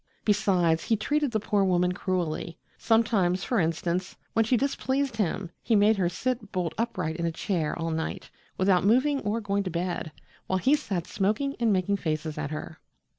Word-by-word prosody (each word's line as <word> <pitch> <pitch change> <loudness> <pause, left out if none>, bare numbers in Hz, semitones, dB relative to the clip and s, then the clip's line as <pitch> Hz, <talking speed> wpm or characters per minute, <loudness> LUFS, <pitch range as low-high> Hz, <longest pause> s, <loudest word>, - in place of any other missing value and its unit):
Besides, 185 -6 +2
he 225 - +2
treated 290 +6 0
the 220 -2 0
poor 205 -1 +1
woman 180 -1 +2
cruelly. 180 -3 -2 0.2
Sometimes, 200 -6 +2
for 240 - +1
instance, 170 +2 -1 0.2
when 225 - +4
she 240 +3 +2
displeased 270 -1 -1
him, 190 -3 -1
he 230 - +2
made 210 +2 +5
her 180 -3 +2
sit 235 +2 -3
bolt 175 -3 -1
upright 185 -9 -2
in 170 -1 -1
a - - 0
chair 165 -2 -2
all 165 0 -2
night, 160 0 -3 0.3
without 185 -1 +3
moving 260 +7 +3
or 215 -1 -1
going 200 -2 -1
to 190 - -3
bed, 175 -2 -3 0.4
while 190 - +1
he 225 +10 +3
sat 195 - -1
smoking 220 +8 0
and 230 -2 +3
making 195 +1 +1
faces 155 -3 -3
at 150 -2 -3
her. 155 +1 -6
190 Hz, 180 wpm, -27 LUFS, 170-225 Hz, 0.4 s, made